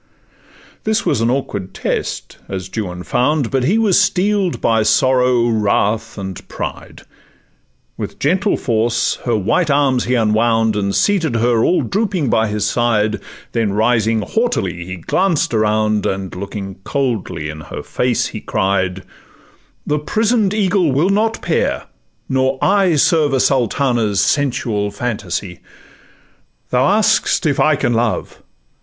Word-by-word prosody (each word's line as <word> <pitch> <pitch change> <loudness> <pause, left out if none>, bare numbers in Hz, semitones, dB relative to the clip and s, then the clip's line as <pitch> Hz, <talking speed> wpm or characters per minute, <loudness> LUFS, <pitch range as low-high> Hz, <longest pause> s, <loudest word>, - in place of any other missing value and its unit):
This 215 -1 0
was 130 -6 +1
an 115 - +2
awkward 105 -8 -3
test, - - -3
as 95 -1 -5
Juan 90 -5 -4
found, 130 +3 0
But 130 -2 +1
he 195 +10 +2
was 215 -5 +4
steel'd 195 -1 +1
by 115 -1 +2
sorrow, 125 +1 +3
wrath, 110 -1 0
and 95 -2 -7
pride: - - -7 0.9
With - - -6
gentle 190 +8 +1
force 115 -1 0
her 120 -2 +1
white 135 - +1
arms 140 -3 +2
he 125 - +1
unwound, 110 0 +2
And 100 -1 -1
seated 170 - +1
her 115 0 +2
all 180 - +2
drooping 195 - -1
by 110 0 +2
his 105 -1 -2
side, 110 -2 +1 0.3
Then 110 -4 0
rising 110 0 +2
haughtily 95 - -1
he 95 - -5
glanced 165 - 0
around, 110 -1 +1
And 95 -1 -3
looking 95 0 -6
coldly 120 - -2
in 75 0 -7
her - - -8
face, 125 -2 0
he 110 - -6
cried, 95 -2 -1 0.8
'The 150 0 0
prison'd 215 +5 +1
eagle 190 -6 +2
will 155 +9 +2
not 220 +3 0
pair, - - 0 0.4
nor 130 0 +1 0.4
Serve 150 -1 +3
a 135 - +2
Sultana's 120 -5 +1
sensual 105 -2 0
phantasy. 100 -4 -4 1.1
'Thou 130 +2 +3
ask'st 210 -3 +2
if 145 -3 +1
I 155 0 +4
can 120 -3 0
love? 115 0 -2
120 Hz, 135 wpm, -17 LUFS, 105-145 Hz, 1.1 s, was